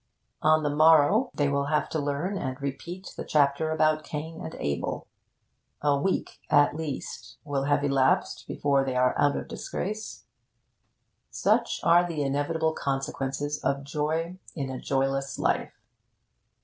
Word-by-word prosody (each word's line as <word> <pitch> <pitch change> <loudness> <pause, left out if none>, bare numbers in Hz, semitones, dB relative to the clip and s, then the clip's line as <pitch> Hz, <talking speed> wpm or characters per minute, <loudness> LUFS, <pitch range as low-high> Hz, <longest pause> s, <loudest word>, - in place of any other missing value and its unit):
On 155 0 +4
the 145 -1 0
morrow 160 - +5
they 145 - +2
will 140 0 0
have 150 +1 +1
to 160 - -1
learn 145 +7 -2
and 130 -8 -3
repeat 170 +7 -6
the - - -5
chapter 145 +1 +2
about 155 -1 +2
Cain 160 +2 -6
and 160 - -6
Abel. 70 -1 -3 0.8
A 145 -1 +4
week, 185 +7 -1
at 145 0 +4
least, 155 -4 -6
will 140 -2 -1
have 145 0 +2
elapsed 135 -2 +1
before 140 -1 +1
they 130 -1 -2
are 125 0 +3
out 145 0 +3
of - - -5
disgrace. 215 +3 -5 1.0
Such - - +1
are 170 +1 +6
the 165 -4 -2
inevitable 160 +4 0
consequences 135 +1 -3
of 140 0 0
joy 160 +5 -2 0.2
in 135 -4 -3
a 130 - -6
joyless 135 0 -1
life. - - -1
145 Hz, 145 wpm, -27 LUFS, 140-160 Hz, 1.0 s, are